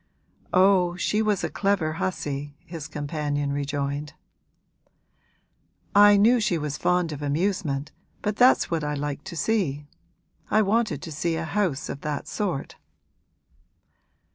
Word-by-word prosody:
'Oh, 185 -2 +4
she 210 +4 0
was 210 -3 +1
a - - -1
clever 195 -6 0
hussy!' 145 -5 -3
his 165 -3 -7
companion 145 -1 -2
rejoined. 145 +1 -3 1.8
'I 205 0 +7
knew 235 +5 +5
she 205 -6 +1
was 150 -2 -3
fond 180 0 +1
of 150 -1 -6
amusement, 150 -2 -1 0.3
but 210 0 0
that's 250 -3 +4
what 165 -2 0
I 150 0 -1
liked 145 0 -4
to - - -7
see. 160 -8 0 0.6
I 215 +1 +4
wanted 205 - 0
to 165 - -6
see 165 +2 -1
a 165 0 -3
house 175 -6 -1
of 140 - -6
that 150 -1 -4
sort.' 185 -10 -3
160 Hz, 135 wpm, -25 LUFS, 145-200 Hz, 1.8 s, I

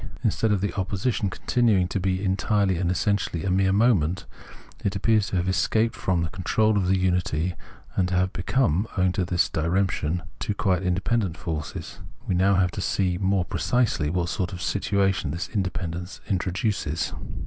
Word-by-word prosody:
Instead 110 - +1
of 100 -3 +1
the 100 - -1
opposition 100 +2 -1
continuing 105 -2 +2
to 100 - -2
be 95 +1 -1
entirely 95 0 +1
and 85 0 0
essentially 95 -2 0
a 95 - +1
mere 95 +1 +3
mo 115 +5 +5
ment, 85 -1 -1 0.6
it 100 0 0
appears 105 +1 +2
to 95 - -3
have 90 0 0
escaped 110 +4 +1
from 90 -3 0
the 80 - -2
control 110 +5 +1
of 95 -3 +1
the 95 +1 +3
unity 90 -2 0 0.4
and 90 - +2
to 90 - -1
have 95 +1 +1
become, 100 - +1
owing 90 -1 +3
to 95 - -1
this 90 0 +1
diremp 90 +4 +1
tion, 85 +3 -2 0.2
two 105 - -2
quite 95 -3 +1
independent 95 +1 0
forces. 80 -3 -5 0.3
We - - 0
have 95 +2 +3
now 95 - +4
to 90 +2 -4
see 90 -1 0
more 95 -2 +1
precisely 115 -13 0
what 85 +1 -1
sort 95 +1 -2
of 90 - -6
situation 95 -4 +1
this 85 +4 -4
inde 95 -5 -1
pendence 90 +1 -5
introduces. 95 -4 -1
95 Hz, 180 wpm, -25 LUFS, 90-100 Hz, 0.6 s, mo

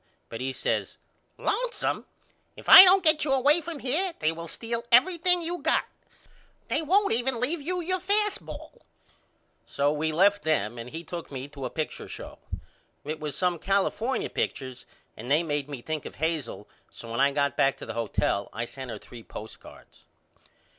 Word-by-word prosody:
But 115 - -7
he 135 +1 -2
says 130 - -2 0.4
Lonesome. - - -1 0.5
If - - -13
I 375 - +13
don't 380 0 +6
get 315 -2 +5
you 290 - -1
away 290 +5 +3
from 330 0 -6
here 320 +8 -1
they 155 - +1
will 165 +1 -7
steal 230 +5 -4
everything 350 +7 +4
you 345 +2 -3
got. - - +1 0.8
They 310 - 0
won't 390 +6 +2
even 245 +1 +1
leave 290 +7 0
you 360 +4 -2
your 370 +2 -1
fast 410 +3 +1
ball. - - -11 0.8
So 145 +1 0
we 155 +1 -1
left 195 +5 +3
them 120 -8 -1
and 115 +1 -7
he 165 +5 -7
took 170 -3 -8
me 135 0 -6
to 140 -2 -8
a - - -3
picture 155 +3 -5
show. - - -9 0.7
It 155 +1 -4
was 150 -2 -4
some 180 -2 0
California 205 +7 -1
pictures 130 -2 -4 0.3
and 120 +4 -9
they 150 +4 +3
made 145 -3 -3
me 135 -5 -7
think 155 -2 -4
of - - -11
Hazel 160 -5 -3 0.2
so 115 - -11
when 115 - -3
I 140 +1 +4
got 140 -2 0
back 135 0 +2
to - - -9
the - - -6
hotel 105 -3 -1
I 115 - -4
sent 130 +1 -9
her 110 - -5
three 115 +3 -12
postcards. 110 0 -13
170 Hz, 180 wpm, -26 LUFS, -, 0.8 s, I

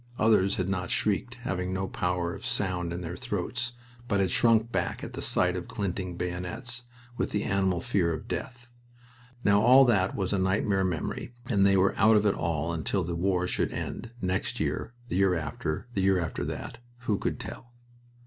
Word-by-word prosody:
Others 105 -3 +4
had 90 - -1
not 95 -2 -2
shrieked, 105 +3 0
having 90 -4 -2
no 95 +1 -1
power 90 -2 -1
of - - -9
sound 90 -3 -1
in 85 +1 -4
their 85 0 -5
throats, 120 +2 -3 0.3
but 100 -3 +1
had 95 -2 +2
shrunk 115 +1 +3
back - - -1
at - - -6
the - - -5
sight 90 0 +2
of 90 - -4
glinting 95 -4 -3
bayonets, 90 +8 -3 0.3
with - - -1
an 105 - +2
animal 95 -2 +1
fear 85 -3 +1
of 80 - -5
death. 125 -2 -6 0.7
Now, 100 0 +5
all 130 +4 +8
that 100 -6 +2
was 95 -1 -1
a 100 - +1
nightmare 95 +1 +2
memory, 95 +6 -3
and 100 -6 +3
they 100 0 +4
were 95 +1 +3
out 110 +1 +6
of 105 - +2
it 100 - +4
all 80 0 -1
until 85 +4 0
the 85 +1 -3
war 90 +1 +1
should - - 0
end, 115 - -5
next 95 -3 -1
year, 120 - -2
the 100 - -2
year 95 -2 +4
after, 80 +1 -3
the 100 - 0
year 95 -1 +4
after 85 -2 -3
that 115 - -5 0.2
who 110 -4 0
could - - -2
tell? 120 - -8
95 Hz, 195 wpm, -28 LUFS, 90-110 Hz, 0.7 s, all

